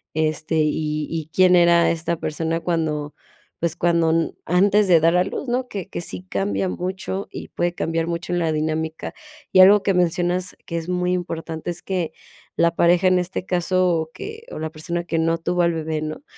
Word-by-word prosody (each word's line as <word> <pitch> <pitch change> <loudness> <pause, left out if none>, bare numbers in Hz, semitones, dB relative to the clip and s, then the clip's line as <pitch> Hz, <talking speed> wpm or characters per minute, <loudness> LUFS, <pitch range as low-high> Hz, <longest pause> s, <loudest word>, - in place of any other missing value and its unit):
este, 155 +1 -1
y 150 0 0
y, 160 -2 -4
quién 185 +1 +5
era 170 -1 +5
esta 170 0 -2
persona 165 +2 -2
cuando, 155 -4 -2 0.5
pues 170 -1 0
cuando 170 -2 +2
n 165 0 +1
antes 200 +3 +3
de 170 -3 +6
dar 165 +2 +4
a 180 - +4
luz, 265 - -5
¿no?, 250 +1 -1
que 200 -7 -6
que - - -5
sí 95 - -4
cambia 100 0 -1
mucho, 190 - -4
y - - -7
puede 175 0 -1
cambiar 165 0 -1
mucho 170 +1 -3
en 175 - +1
la 165 -2 +1
dinámica. 160 +1 -2 0.4
Y 185 - +5
algo 195 +1 +8
que 195 - +2
mencionas 180 +1 0
que 170 - -4
es 165 +1 -5
muy 180 0 0
importante 165 -2 -4
es 175 - -7
que 180 -4 -2 0.4
la 170 0 +3
pareja 175 +2 +4
en 185 0 +4
este 180 +1 -3
caso 185 +1 +1
o 160 -2 -1
que 445 +1 -8
o - - -6
la 160 - -3
persona 170 +2 -4
que 165 -1 -2
no 165 +1 +1
tuvo 180 +2 0
al 170 0 +2
bebé, 160 -1 -3
¿no?, 155 - -5
170 Hz, 200 wpm, -22 LUFS, 160-180 Hz, 0.5 s, algo